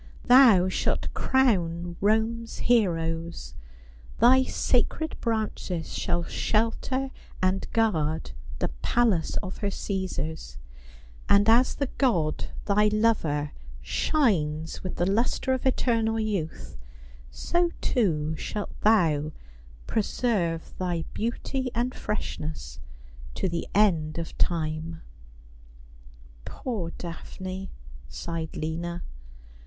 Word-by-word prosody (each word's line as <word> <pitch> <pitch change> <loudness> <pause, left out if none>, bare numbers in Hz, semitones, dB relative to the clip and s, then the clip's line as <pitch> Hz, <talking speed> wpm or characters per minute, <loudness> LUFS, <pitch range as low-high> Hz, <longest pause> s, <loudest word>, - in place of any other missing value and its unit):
Thou 245 -8 +7
shalt 185 - -1
crown 175 -10 +1
Rome's 225 +2 +1
heroes; 170 -7 0 0.6
thy 255 +3 +6
sacred 260 +4 0
branches 215 -7 -2
shall 175 -1 0
shelter 230 +8 0 0.3
and 185 +1 0
guard 160 - +1 0.3
the - - -1
palace 220 - +2
of 185 -1 -6
her 205 - -1
Cii^sars; 190 -5 -3 0.7
and 200 +1 +5
as 240 +3 +5
the 280 - 0
god, 175 - +2 0.2
thy 210 +1 +4
lover, 205 -10 +1 0.3
shines 160 - 0
with 185 - -5
the 175 - +1
lustre 235 +6 +1
of 260 0 0
eternal 225 -3 +1
youth, 195 - -3 0.5
so, 345 0 0
too, 160 -9 +1
shalt 205 +5 -4
thou 160 -9 +3 0.5
preserve 200 -7 -1
thy 175 -3 -1
beauty 250 +3 -2
and 245 +2 0
freshness 155 - -4 0.6
to 190 - 0
the 170 -1 -3
end 165 -7 +3
of 165 -1 -5
time." 160 0 -1 0.5
' - - -22
' - - -22
Poor 215 -10 -4
Daphne,' 185 +2 -6 0.4
sighed 165 - -5
Lina. 170 +2 -3
185 Hz, 100 wpm, -27 LUFS, 160-225 Hz, 0.7 s, Thou